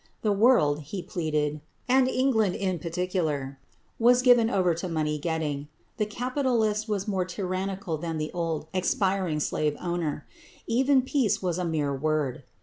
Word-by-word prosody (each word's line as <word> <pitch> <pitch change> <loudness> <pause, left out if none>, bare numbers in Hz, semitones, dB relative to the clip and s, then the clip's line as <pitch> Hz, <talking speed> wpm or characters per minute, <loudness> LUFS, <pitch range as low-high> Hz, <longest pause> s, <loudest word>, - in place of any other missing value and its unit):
The 215 - +2
world, 200 - +4
he 170 +5 -6
pleaded 155 -5 -2 0.3
and 260 0 +4
England 245 -8 +2
in 185 -3 -1
particular 160 -6 -2 0.4
was 245 +2 +5
given 240 -3 +6
over 185 -6 +2
to 170 +3 -4
money 155 -2 -1
getting. 150 -3 -2 0.3
The 210 -2 0
capitalist 235 -3 0
was 205 -1 -1
more 190 -3 0
tyrannical 185 -2 -3
than 165 -1 -3
the 155 0 -3
old, 165 -3 -2
expiring 185 -3 0
slave 150 0 -1
owner. 170 -4 -3 0.4
Even 260 +3 +3
peace 245 -8 0
was 180 -1 -1
a 180 - -1
mere 150 -4 0
word. 145 -2 -1
180 Hz, 145 wpm, -27 LUFS, 155-215 Hz, 0.4 s, given